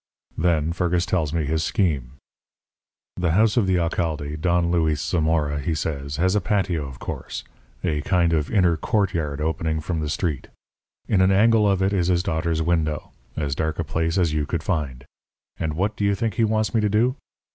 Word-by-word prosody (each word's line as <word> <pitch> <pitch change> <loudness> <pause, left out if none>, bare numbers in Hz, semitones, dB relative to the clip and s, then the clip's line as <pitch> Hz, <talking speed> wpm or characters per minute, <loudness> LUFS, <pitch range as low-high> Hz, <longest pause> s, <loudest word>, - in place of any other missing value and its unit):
"Then 80 -1 +1
Fergus 90 0 0
tells 80 -5 0
me 80 -2 -1
his 80 +2 0
scheme. 75 -12 0 1.0
"The 90 -3 +1
house 110 +3 +3
of 115 -6 +2
the 95 -1 +3
alcalde, 80 -3 -1
Don 85 -1 +2
Luis 80 -4 +1
Zamora, 80 -2 0
he 80 +3 -1
says, 70 -2 -3
has 95 +3 +2
a 105 - +2
patio, 90 -6 0
of 65 - -10
course - - -6 0.4
a 75 -5 0
kind 85 0 +2
of 75 -2 0
inner 90 -5 +3
courtyard 85 -6 -1
opening 80 0 -1
from 80 +1 -3
the 75 -1 -2
street. 75 -2 -2 0.6
In 100 -4 +3
an 95 +1 +4
angle 105 +1 +4
of 95 -1 +1
it 95 +1 +1
is 90 -3 +1
his 90 -1 +2
daughter's 80 -3 -1
window 80 -3 -1 0.3
as 70 -3 -1
dark 80 +2 -2
a 85 - -1
place 80 +2 -1
as 85 -4 +2
you 75 -2 -1
could 85 -2 -2
find. 70 -9 -2 0.5
And 80 -2 -2
what 100 +5 0
do - - -3
you 100 0 +2
think 115 0 -1
he 115 - +1
wants 110 0 0
me 115 - +3
to 105 - +1
do? 115 +5 +2
85 Hz, 195 wpm, -23 LUFS, 75-95 Hz, 1.0 s, an